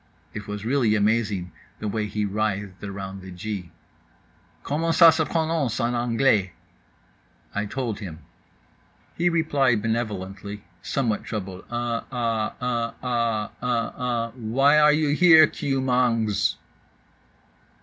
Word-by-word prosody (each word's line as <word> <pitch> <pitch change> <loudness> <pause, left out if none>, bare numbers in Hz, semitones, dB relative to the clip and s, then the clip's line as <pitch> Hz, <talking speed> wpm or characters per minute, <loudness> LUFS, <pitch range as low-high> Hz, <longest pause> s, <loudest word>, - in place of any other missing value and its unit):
It 105 -1 -7
was 105 0 -5
really 120 -4 +2
amazing, 105 -4 0 0.3
the 105 - -4
way 105 0 -1
he 105 0 -2
writhed 100 -1 -2
around 100 -1 -6
the 95 - -10
G. 90 0 -5 0.9
"Comment 165 +3 0
ça 165 -1 +8
se 160 - +1
prononce 160 -7 -1
en 120 0 0
anglais?" 120 -5 +2 1.0
I 105 0 -2
told 115 -2 -3
him. 90 -7 -7 1.0
He 175 +1 +2
replied 140 -9 +2
benevolently, 105 -3 -3 0.2
somewhat 120 -7 -1
troubled 95 -4 -6
"uh 120 -1 -2
ah 115 -3 -1
uh 120 -2 -1
ah 115 -4 0
uh 120 -2 0 0.4
ah—why 135 +5 +3
are 150 0 +6
you 150 0 +2
here, 160 +1 +7
KEW 135 -2 -2
MANGZ?" 115 -5 +1
115 Hz, 120 wpm, -24 LUFS, 105-135 Hz, 1.0 s, ça